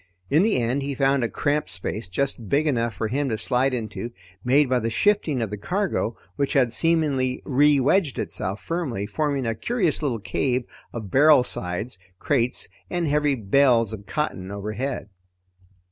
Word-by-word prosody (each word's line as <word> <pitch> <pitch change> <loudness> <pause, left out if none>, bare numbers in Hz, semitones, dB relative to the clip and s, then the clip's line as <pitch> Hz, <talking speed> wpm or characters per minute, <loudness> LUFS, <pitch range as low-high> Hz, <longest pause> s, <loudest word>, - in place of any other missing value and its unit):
In 150 +4 +5
the 215 +2 +2
end 125 +4 0
he 140 0 -3
found 135 -1 +2
a 115 - 0
cramped 150 +5 -1
space, 100 +3 -4
just 115 0 -2
big 145 +3 +2
enough 120 -7 0
for 110 - -2
him 135 +4 -1
to 110 - -1
slide 125 +4 +1
into, 115 -1 -4 0.3
made 140 +3 +4
by 125 0 +2
the 115 0 -1
shifting 155 - +1
of 110 - -4
the 105 - -5
cargo 180 - -1 0.2
which 140 +2 0
had 125 -5 +3
seemingly 145 -4 +1
rewedged 145 +3 +3
itself 95 +3 -3
firmly, 145 - -2
forming 140 +4 -1
a 115 - 0
curious 185 - 0
little 135 -6 0
cave 125 +3 -1 0.3
of 110 -5 -7
barrel 145 -1 +6
sides, 95 +1 -3 0.2
crates, 125 +1 +1 0.2
and 175 -2 -1
heavy 150 -1 +2
bales 115 0 +3
of 105 -2 -8
cotton 95 -11 -3
overhead. 105 +4 -4
130 Hz, 165 wpm, -24 LUFS, 115-145 Hz, 0.3 s, barrel